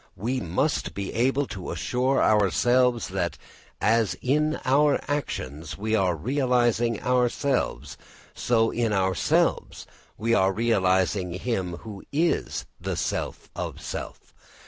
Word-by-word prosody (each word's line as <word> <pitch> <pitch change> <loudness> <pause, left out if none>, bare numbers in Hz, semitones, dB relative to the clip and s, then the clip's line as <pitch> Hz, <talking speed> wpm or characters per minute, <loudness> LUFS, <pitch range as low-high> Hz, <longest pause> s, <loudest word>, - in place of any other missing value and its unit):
We 120 +8 -1
must 95 - -1
be 100 -1 -4
able 135 +5 +1
to 95 -7 -7
assure 130 +2 0
ourselves 120 +4 +3
that 90 -2 -2 0.4
as 115 -1 +2
in 150 +4 +1
our 145 +3 +4
actions 80 - -4
we 110 +2 -2
are 95 -4 +2
realising 120 - +1
ourselves, 125 - 0 0.3
so 115 -2 +1
in 115 -2 0
ourselves 95 -3 +1 0.3
we 115 +2 0
are 95 -3 +4
realising 95 -4 +1
him 95 -3 -2
who 105 -3 -9
is 165 +4 0
the - - -3
self - - -3
of - - -5
self. - - -7
115 Hz, 120 wpm, -25 LUFS, 95-125 Hz, 0.4 s, our